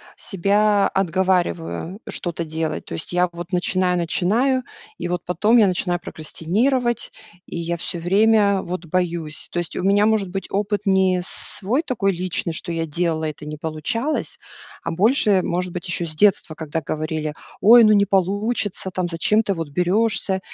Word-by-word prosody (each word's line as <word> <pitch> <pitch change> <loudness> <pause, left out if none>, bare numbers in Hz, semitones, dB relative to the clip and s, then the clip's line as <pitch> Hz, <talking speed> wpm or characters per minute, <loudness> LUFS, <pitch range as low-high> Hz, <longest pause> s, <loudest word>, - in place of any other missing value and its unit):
себя 200 +1 +2
отговариваю 185 0 -1
что-то 170 -1 -3
делать. 160 - -3
То - - -8
есть 80 - -5
я 180 0 +2
вот 175 +2 -8
начинаю 180 0 +1
начинаю 225 +10 +1 0.4
и 175 - -3
вот 175 -1 -3
потом 210 +7 +3
я 210 -3 +6
начинаю 180 -1 0
прокрастинировать, 230 - -1 0.4
и - - -6
я 170 0 -2
всё 170 +1 -4
время 200 +2 +3
вот 175 -1 -5
боюсь. 170 -2 -2
То - - -5
есть 175 - -4
у - - -3
меня 200 +2 +4
может 215 -4 +1
быть 195 +1 -4
опыт 205 0 -1
не 190 -2 +3
свой 210 +11 -1
такой 200 -8 0
личный, 175 -2 -2
что 170 +2 -5
я 165 0 -1
делала, 160 0 -1
и - - -2
это 150 0 -11
не 150 0 -6
получалось, 165 - -2 0.5
а - - -3
больше, 205 - +3
может 180 0 -2
быть, 180 +1 -5
еще 175 0 0
с 155 -1 -7
детства, 200 -4 +3
когда 160 0 -4
говорили: 155 -1 -3 0.3
"Ой, 235 +3 +8
ну 215 0 +6
не 200 -1 +4
получится. 200 0 0
Там. 180 -1 -1
Зачем 180 +6 +2
ты 200 - 0
вот 165 -3 -4
берешься?" 190 +3 +1
185 Hz, 170 wpm, -21 LUFS, 170-205 Hz, 0.5 s, Ой